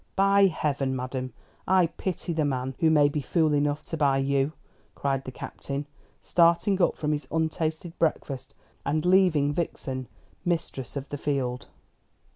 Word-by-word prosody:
"By 195 0 +5
Heaven, 140 -6 -1
madam, 130 0 -4 0.4
I 185 -1 +5
pity 170 +1 -3
the 160 -1 +1
man 130 -2 -1
who 160 - +4
may 150 -2 +5
be 145 +1 -2
fool 155 +2 +2
enough 145 +1 0
to 165 - -4
buy 140 -3 +3
you!" 135 +2 +1 0.4
cried 135 -1 -1
the 130 - -5
Captain, 140 +2 -5 0.4
starting 170 +3 +3
up - - +3
from 150 -1 -1
his 145 -3 -2
untasted 160 +1 -1
breakfast, 140 -5 -1 0.3
and 155 +3 0
leaving 180 -6 +4
Vixen 135 -5 -3 0.4
mistress 160 -7 -2
of 140 0 -4
the 145 - -5
field. 130 -4 -2
150 Hz, 150 wpm, -27 LUFS, 135-165 Hz, 0.4 s, By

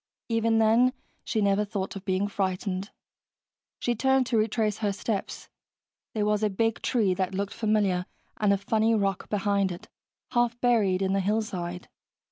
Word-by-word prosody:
Even 225 0 +2
then, 230 +3 +4 0.3
she 220 - -1
never 200 +1 +3
thought 200 -2 -4
of 195 - -7
being 190 +1 +1
frightened. 190 0 -2 0.9
She 240 - 0
turned 265 +2 +2
to 235 -2 0
retrace 215 -1 0
her 210 -2 0
steps. 200 +1 -4 0.7
There 210 -1 +1
was 210 0 +1
a 215 - +2
big 225 +3 0
tree 215 -7 +2
that 185 0 -2
looked 200 +1 -2
familiar, 205 -5 +1 0.3
and 210 -2 +2
a 200 - +3
funny 220 +3 +1
rock 195 -3 -1
behind 200 -2 +1
it, 175 - -9 0.4
half 240 -1 +1
buried 210 -7 +2
in 190 0 +1
the 195 - +2
hillside. 185 -4 -2
205 Hz, 160 wpm, -27 LUFS, 195-225 Hz, 0.9 s, then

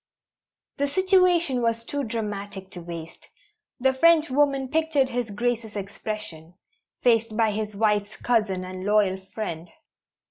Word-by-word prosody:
The 285 - +1
situation 360 -5 +3
was 230 0 0
too 285 +4 -3
dramatic 205 -4 -5
to 180 - -8
waste. 165 -1 -9 0.5
The 265 +1 +3
Frenchwoman 285 -3 +3
pictured 310 -3 +2
His 245 -2 -2
Grace's 225 0 -2
expression, 195 -4 -6 0.5
faced 230 -2 +2
by 225 -2 +3
his 210 0 -4
wife's 210 0 +1
cousin 210 -6 0
and 185 0 -7
loyal 205 -2 +2 0.2
friend. 175 -6 -4
220 Hz, 120 wpm, -25 LUFS, 200-265 Hz, 0.5 s, situation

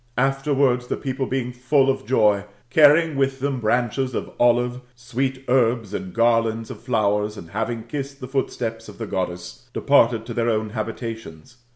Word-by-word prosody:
Afterwards, 135 -1 +1
the - - -2
people 130 -1 -3
being 130 -2 -2
full 130 +2 +2
of 135 -5 -1
joy^ 105 -5 +3 0.3
carrying 155 +2 +5
with 135 0 0
them 135 -1 -1
branches 120 +3 0
of - - -4
olive, 120 +1 +2
sweet 130 +2 -3
herbs, 120 -4 +2
and 95 -2 -4
gar 115 +2 +4
lands 115 0 -4
of - - -10
flowers, 105 -3 0
and 85 -3 -10
having 115 +2 -2
kissed 140 +2 -6
the 130 - -7
footsteps 115 -4 -3
of - - -12
the 115 - -4
(roddess, 90 +3 -5
departed 115 -5 +3
to 120 - -6
their 115 0 0
own 110 -1 -1
habitations. 110 -2 -6
120 Hz, 170 wpm, -23 LUFS, 110-135 Hz, 0.3 s, carrying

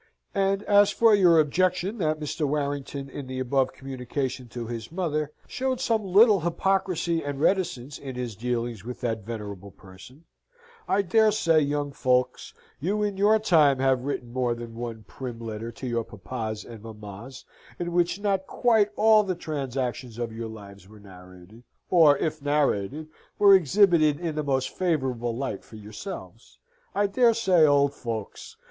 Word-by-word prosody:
And 195 -1 +1
as 205 -1 +5
for 225 +1 +4
your 180 -5 +6
objection 185 +7 +1
that 155 -3 0
Mr. 150 0 -2
Warrington, 140 -1 -3
in 135 0 -8
the 130 0 -6
above 130 +1 +1
communication 130 -1 -5
to 120 0 -6
his 115 +2 -6
mother, 155 -4 -2
showed 260 -1 -2
some 230 -4 0
little 200 +2 +5
hypocrisy 175 -1 0
and 145 -1 -4
reticence 150 -6 0
in 135 -2 -7
his 125 -3 -4
dealings 120 -1 -3
with 125 +2 -8
that 115 -3 -1
venerable 100 -3 -7
person, 100 - -15 0.6
I 200 - +2
dare 215 +4 +4
say, 165 -6 +3
young 145 -1 -1
folks, 125 -2 0 0.2
you 205 +8 -1
in 205 -1 -1
your 205 +3 +4
time 160 -10 +4
have 130 -1 +1
written 125 -4 -4
more 125 -2 0
than 120 -1 -8
one 115 -1 -6
prim 125 -3 -7
letter 115 0 -6
to 130 - -8
your 120 -2 -1
papas 110 +1 -6
and 115 -3 -11
mammas 110 +3 -10 0.3
in 175 0 -3
which 175 +2 +1
not 195 -2 -1
quite 220 -4 +2
all 220 0 +5
the 190 -3 -2
transactions 130 -6 -4
of 120 -2 -4
your 115 0 -5
lives 100 -3 -12
were 110 0 -15
narrated, 90 +2 -15 0.3
or 155 -5 +6
if 155 0 -2
narrated, 145 -1 0 0.3
were 200 -1 +7
exhibited 170 -4 +4
in 170 -2 -3
the 155 - -2
most 135 -2 0
favourable 130 -10 -1
light 130 -7 -4
for - - -15
yourselves 110 - -9 0.4
I 205 - +2
dare 230 +3 +3
say, 185 -8 +4
old 140 -1 +3
folks! 115 -6 -6
140 Hz, 165 wpm, -26 LUFS, 120-180 Hz, 0.6 s, were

